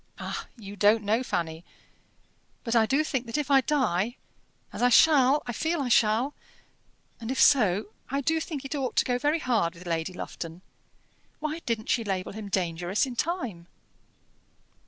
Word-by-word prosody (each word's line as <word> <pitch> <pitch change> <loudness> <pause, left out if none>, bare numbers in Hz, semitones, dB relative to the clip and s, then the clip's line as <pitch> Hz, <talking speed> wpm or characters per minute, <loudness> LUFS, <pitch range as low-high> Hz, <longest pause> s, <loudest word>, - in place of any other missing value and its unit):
"Ah! - - -5
you 205 -2 -9
don't 210 +2 +4
know, 215 +4 +1
Fanny. 165 -8 -3 1.0
But 230 0 -1
I 225 -1 +4
do 275 +5 +2
think 265 -6 -3
that 230 - -2
if 290 -1 -2
I 270 -1 +6
die 245 -6 0 0.6
as - - -5
I 245 - +5
shall 280 +1 +5
I 245 - -3
feel 320 +8 -1
I 265 -3 -1
shall; 230 +5 +3 0.9
and 225 -1 -6
if 260 - -2
so, 215 -7 +4 0.2
I 275 - -1
do 320 +4 +1
think 290 -4 -5
it 275 - -4
ought 270 -4 -2
to - - +3
go 245 -1 0
very 295 +4 +1
hard 225 - 0
with 175 +2 -13
Lady 165 +1 -2
Lufton. 170 0 -7 0.8
Why 310 +1 -3
didn't 225 -2 -2
she 235 - +2
label 190 -3 -3
him 210 -1 -7
'dangerous' 180 - 0
in 255 -2 -7
time?" 240 - -3
235 Hz, 175 wpm, -27 LUFS, 195-275 Hz, 1.0 s, I